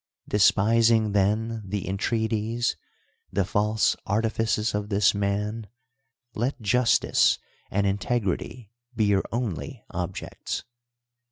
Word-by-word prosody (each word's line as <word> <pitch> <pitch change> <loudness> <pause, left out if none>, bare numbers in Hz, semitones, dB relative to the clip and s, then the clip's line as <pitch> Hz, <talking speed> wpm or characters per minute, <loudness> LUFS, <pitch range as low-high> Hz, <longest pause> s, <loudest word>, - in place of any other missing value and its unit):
Despising, 110 +1 +4
tlu^n, 110 +3 +1
the 100 0 -3
entrc^aties. 110 +3 -1 0.6
the 95 0 +1
false 105 +3 +1
arti 110 +3 +1
fifcs 110 -1 0
of 105 0 -2
this 100 0 +3
man, 105 +2 -2 0.7
b't 120 +6 -2
.justi('(^ 120 +3 +3 0.3
and 100 +1 0
iiiteurity 100 +2 -2 0.3
be 110 -1 +2
your 100 -1 +2
only 110 - -4
objc 90 +1 -4
ts. - - -3
105 Hz, 105 wpm, -26 LUFS, 100-115 Hz, 0.7 s, Despising